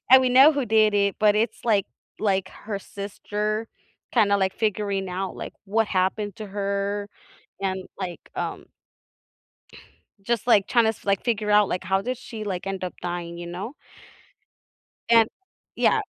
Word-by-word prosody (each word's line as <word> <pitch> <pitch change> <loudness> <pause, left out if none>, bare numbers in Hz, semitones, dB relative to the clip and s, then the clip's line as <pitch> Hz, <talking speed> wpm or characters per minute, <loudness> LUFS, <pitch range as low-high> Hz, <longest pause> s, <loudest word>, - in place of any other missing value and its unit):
And 260 0 +10
We 255 - +3
know 270 +5 +8
who 280 -3 -1
did 215 -1 +4
it 200 -1 +2
but 210 -1 +5
it's, 225 +2 -1
like 210 -5 +2 0.3
like, 195 -3 +1
her 205 -2 -6
sister 210 +2 -4 0.5
kind 215 -4 +4
of, 200 - +4
like, 190 0 +1
figuring 200 -3 -1
out, 190 +1 -3
like, - - -6
what 220 +3 +2
happened 195 +1 0
to 215 - -6
her 200 0 -2 0.5
and, 190 -1 -2
like, 180 -3 -4 0.2
um - - -4 1.5
Just, 235 +2 -1
like, 210 -5 +5
trying 235 -2 +4
to - - +4
s 220 - -6
like, 200 -1 +1
figure 215 -3 0
out, 210 -1 +6
like, 180 - -2
how 190 0 +1
did 250 +4 -3
she, 225 -2 -7
like, 195 -2 -4
end 195 -1 -3
up 180 - -3
dying, 175 -1 -4
you 175 0 -6
know 190 +10 -6 1.3
And 230 -1 +6 0.5
yeah. 445 - +3
205 Hz, 165 wpm, -25 LUFS, 190-220 Hz, 1.5 s, And